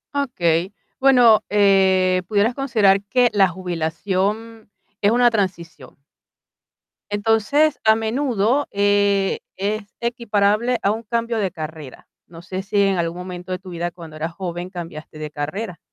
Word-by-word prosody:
Okey, 185 - 0 0.2
bueno, 245 -5 +5
eh, 190 -2 +3
pudieras 215 +3 +2
considerar 215 -8 +2
que 245 +4 +2
la 195 -2 +5
jubilación 190 +6 -3 0.3
es 205 - +4
una 240 0 +4
transición. 170 - -4 1.1
Entonces, 225 +9 +2
a 220 0 +5
menudo, 235 +2 0
eh, 200 -1 +2 0.2
es 205 +2 -2 0.2
equiparable 235 0 0
a 200 - +2
un 225 +2 -4
cambio 230 +1 -2
de 195 -4 -1
carrera. 155 -4 -9 0.2
No 165 0 -12
sé 185 +2 -5
si 200 +1 +1
en 195 -2 +2
algún 170 +1 -2
momento 180 0 -7
de 180 - -2
tu 190 -1 -12
vida 175 0 -3
cuando 165 -2 -12
eras 160 +2 -4
joven 175 0 -5
cambiaste 165 -4 -9
de 155 -1 -5
carrera. 170 +7 -5
200 Hz, 140 wpm, -21 LUFS, 175-225 Hz, 1.1 s, bueno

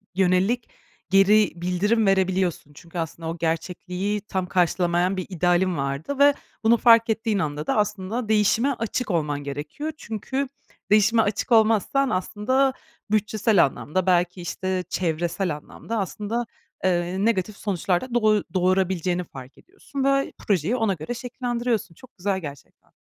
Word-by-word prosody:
yönelik 190 +6 +2 0.4
geri 195 +1 +5
bildirim 185 +6 +1
verebiliyorsun. 190 -5 +1
Çünkü 170 +4 -11
aslında 165 0 -4
o 165 - -4
gerçekliği 180 +5 -2
tam 190 -2 -3
karşılamayan 180 0 +1
bir 185 - -3
idealin 180 0 +1
vardı 140 - -3
ve 285 0 +7 0.3
bunu 230 +2 +5
fark 230 0 +6
ettiğin 220 -2 0
anda 150 -2 -3
da - - +1
aslında 210 +2 -1
değişime 220 +4 +3
açık 230 -2 -3
olman 150 -4 -1
gerekiyor. 150 - -5
Çünkü 260 +3 -3 0.4
değişime 215 +2 +5
açık 215 +4 -2
olmazsan 225 +4 +3
aslında 210 +9 +1 0.4
bütçesel 215 -2 +3
anlamda 155 +6 -3
belki, 180 0 +2
işte, 185 +1 -2
çevresel 175 0 -1
anlamda 220 +9 -7
aslında, 210 +4 -3 0.4
eee, 185 +1 0
negatif 210 -2 0
sonuçlar 190 -2 0
da 255 -2 -8
doy 215 -3 +3
doğurabileceğini 185 -1 +1
fark 135 -5 -12
ediyorsun 325 -7 -7
ve 275 0 +1
projeyi 195 +2 +1
ona 225 -5 +1
göre 160 +6 -5
şekillendiriyorsun. 240 -5 -3
Çok 255 +2 -18
güzel 190 +1 -1
gerçekten. 145 -5 -11
195 Hz, 135 wpm, -24 LUFS, 175-225 Hz, 0.4 s, ve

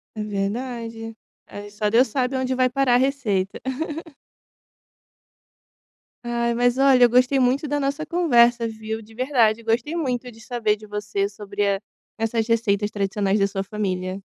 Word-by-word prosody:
É 215 - -3
verdade. 225 +2 -4 0.3
Aí 205 0 -9
só 210 0 -1
Deus 240 +4 +4
sabe 255 +2 -1
onde 260 0 -1
vai 255 0 +3
parar 260 -1 +2
a - - +6
receita. 240 -8 0 2.7
Ai, 235 0 0
mas 245 +1 +2
olha, 270 -2 +5
eu 240 - +7
gostei 250 +3 +3
muito 265 +4 +2
da 290 0 -1
nossa 280 +3 -2
conversa 240 -8 +3
viu, 220 0 -5
de 220 +1 -16
verdade, 235 -3 +2
gostei 230 +8 -1
muito 250 -6 -2
de 225 - -17
saber 220 -2 -1
de 215 0 -13
você 210 -1 -2
sobre 205 0 -3
a 200 0 0 0.4
essas 225 0 -1
receitas 210 -3 +1
tradicionais 200 0 0
da 195 - +4
sua 195 -1 -3
família. 190 -2 -3
230 Hz, 155 wpm, -23 LUFS, 210-255 Hz, 2.7 s, eu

